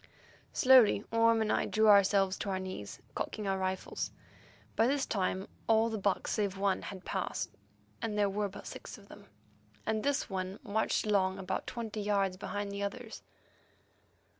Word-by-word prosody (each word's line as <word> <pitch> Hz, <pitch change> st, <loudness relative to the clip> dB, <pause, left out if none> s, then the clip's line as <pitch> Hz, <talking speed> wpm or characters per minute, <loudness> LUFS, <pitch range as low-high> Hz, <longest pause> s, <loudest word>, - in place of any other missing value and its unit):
Slowly 255 Hz, -6 st, +6 dB
Orme 230 Hz, 0 st, +4 dB
and 215 Hz, -, 0 dB
I -, -, +1 dB
drew 220 Hz, 0 st, +3 dB
ourselves 200 Hz, -1 st, +5 dB
to 200 Hz, -, -3 dB
our 190 Hz, -, 0 dB
knees, 185 Hz, -, -6 dB
cocking 210 Hz, -2 st, -3 dB
our 195 Hz, 0 st, 0 dB
rifles. 190 Hz, 0 st, -2 dB, 0.6 s
By 225 Hz, -, +4 dB
this 275 Hz, +1 st, +1 dB
time 190 Hz, -1 st, -1 dB, 0.2 s
all 225 Hz, 0 st, +4 dB
the 220 Hz, -, -2 dB
buck 195 Hz, -1 st, 0 dB
save 200 Hz, -3 st, -1 dB
one 195 Hz, -1 st, +1 dB
had 190 Hz, -3 st, -8 dB
passed; -, -, -2 dB, 0.5 s
there 210 Hz, -2 st, +1 dB
were 200 Hz, +1 st, -1 dB
but 195 Hz, -, -10 dB
six -, -, -8 dB
of -, -, -17 dB
them, -, -, -13 dB, 0.6 s
and 220 Hz, -1 st, 0 dB
this 285 Hz, +3 st, 0 dB
one 190 Hz, -1 st, -4 dB
marched 220 Hz, -1 st, 0 dB
along 190 Hz, -2 st, +2 dB
about 190 Hz, -1 st, -3 dB
twenty 225 Hz, -3 st, -4 dB
yards 200 Hz, -2 st, +1 dB
behind 205 Hz, +1 st, -4 dB
the 200 Hz, 0 st, -4 dB
others. 220 Hz, +3 st, -5 dB
205 Hz, 165 wpm, -32 LUFS, 195-220 Hz, 0.6 s, Slowly